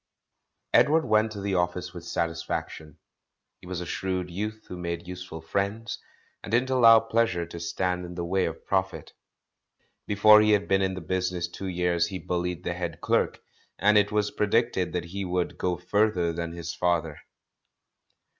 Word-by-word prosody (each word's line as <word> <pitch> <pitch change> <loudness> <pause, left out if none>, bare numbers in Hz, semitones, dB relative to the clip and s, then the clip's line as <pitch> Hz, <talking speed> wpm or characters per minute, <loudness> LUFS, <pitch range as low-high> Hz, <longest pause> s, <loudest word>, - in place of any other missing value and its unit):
Edward 160 +2 +5
went 110 +1 +2
to 105 - -6
the 100 0 -2
office 90 0 -1
with 85 -2 -8
satisfaction. 80 -2 -4 0.6
He - - -14
was 90 -1 -4
a - - -4
shrewd 95 0 -3
youth 105 +4 -5
who - - -7
made 85 -1 -5
useful 90 -3 -7
friends, 100 +7 -2 0.4
and - - -8
didn't 125 +3 +2
allow 115 -3 +7
pleasure 115 -6 0
to 85 0 -9
stand 90 +2 -2
in 90 0 -8
the 85 -1 -3
way 95 +2 +1
of 80 - -6
profit. 95 -1 -2 0.9
Before 105 +1 +7
he 105 0 +4
had 100 -1 +1
been 95 0 +3
in 95 -1 0
the 95 - -6
business 90 +1 -1
two 95 +2 -7
years 90 -2 +1
he 95 - -5
bullied 90 -1 -3
the 85 - -2
head 85 -2 -5
clerk, - - 0 0.4
and 105 +1 +4
it 105 0 +4
was 105 -1 +1
pre 105 - 0
dicted 105 -5 +1
that 90 -1 -2
he 100 +3 -5
would 90 -1 -2
"go 90 -1 0
further 90 -1 +1
than 85 0 -4
his 85 -1 -5
father.' 85 -4 0
90 Hz, 175 wpm, -27 LUFS, 85-105 Hz, 0.9 s, allow